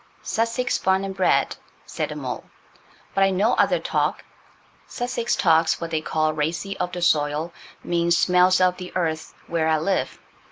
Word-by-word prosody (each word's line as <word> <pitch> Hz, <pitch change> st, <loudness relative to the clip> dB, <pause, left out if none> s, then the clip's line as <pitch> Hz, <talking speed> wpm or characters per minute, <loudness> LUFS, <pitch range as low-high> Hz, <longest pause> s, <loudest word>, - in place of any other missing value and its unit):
"Sussex 230 Hz, +2 st, -1 dB
barn 190 Hz, +1 st, +1 dB
an' 195 Hz, -, -4 dB
bred," 190 Hz, -1 st, +1 dB, 0.3 s
said -, -, -3 dB
the -, -, -6 dB
mole, -, -, -5 dB, 0.7 s
"but 195 Hz, -, +3 dB
I 195 Hz, -, +4 dB
know 200 Hz, +5 st, +2 dB
other -, -, +3 dB
talk. -, -, -1 dB, 0.6 s
Sussex 240 Hz, -1 st, -2 dB
talks 160 Hz, 0 st, +3 dB
what 170 Hz, -1 st, -5 dB
they 160 Hz, -1 st, 0 dB
call 155 Hz, 0 st, 0 dB
'racy 165 Hz, +6 st, -2 dB
of 180 Hz, -, -1 dB
the 175 Hz, 0 st, -4 dB
soil'–means 170 Hz, +2 st, 0 dB
'smells 180 Hz, +2 st, +4 dB
of 180 Hz, -1 st, +3 dB
the 180 Hz, -1 st, -8 dB
earth' 160 Hz, -3 st, -2 dB
where 165 Hz, -2 st, -1 dB
I 160 Hz, 0 st, +3 dB
live. 185 Hz, +5 st, -1 dB
175 Hz, 160 wpm, -23 LUFS, 160-190 Hz, 0.7 s, I